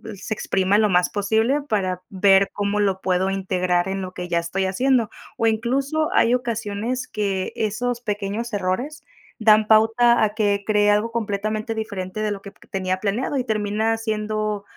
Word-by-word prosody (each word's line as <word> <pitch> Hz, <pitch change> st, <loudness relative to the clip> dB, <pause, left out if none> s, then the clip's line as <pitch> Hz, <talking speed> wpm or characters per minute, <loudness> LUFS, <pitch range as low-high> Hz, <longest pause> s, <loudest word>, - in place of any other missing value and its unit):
se 210 Hz, +3 st, -4 dB
exprima 195 Hz, 0 st, +1 dB
lo 210 Hz, -1 st, +3 dB
más 180 Hz, -1 st, +2 dB
posible 220 Hz, +7 st, +1 dB
para 185 Hz, -4 st, -1 dB
ver 195 Hz, 0 st, +4 dB
cómo 205 Hz, 0 st, -1 dB
lo 195 Hz, -2 st, +1 dB
puedo 185 Hz, +1 st, +1 dB
integrar 185 Hz, -2 st, 0 dB
en 195 Hz, 0 st, -2 dB
lo 185 Hz, 0 st, -6 dB
que 180 Hz, 0 st, -5 dB
ya 170 Hz, -1 st, +1 dB
estoy 185 Hz, +3 st, -2 dB
haciendo. 240 Hz, +4 st, +1 dB, 0.3 s
O 230 Hz, -, 0 dB
incluso 270 Hz, +8 st, 0 dB
hay 235 Hz, -, +4 dB
ocasiones 235 Hz, 0 st, -2 dB
que 195 Hz, -3 st, -2 dB
esos 240 Hz, +3 st, -2 dB
pequeños 210 Hz, +2 st, -3 dB
errores 205 Hz, +11 st, -2 dB, 0.3 s
dan 215 Hz, -1 st, +4 dB
pauta 225 Hz, +2 st, +4 dB
a 210 Hz, -1 st, +1 dB
que 205 Hz, -2 st, 0 dB
creé 210 Hz, -1 st, +3 dB
algo 210 Hz, +3 st, +2 dB
completamente 215 Hz, 0 st, -2 dB
diferente 210 Hz, -2 st, -4 dB
de 210 Hz, -1 st, 0 dB
lo 200 Hz, -, -5 dB
que 200 Hz, 0 st, -10 dB
p -, -, -22 dB
tenía 185 Hz, -1 st, -1 dB
planeado 230 Hz, +7 st, -1 dB
y 255 Hz, -, 0 dB
termina 220 Hz, 0 st, 0 dB
siendo 215 Hz, -2 st, -2 dB
210 Hz, 170 wpm, -22 LUFS, 195-225 Hz, 0.3 s, ver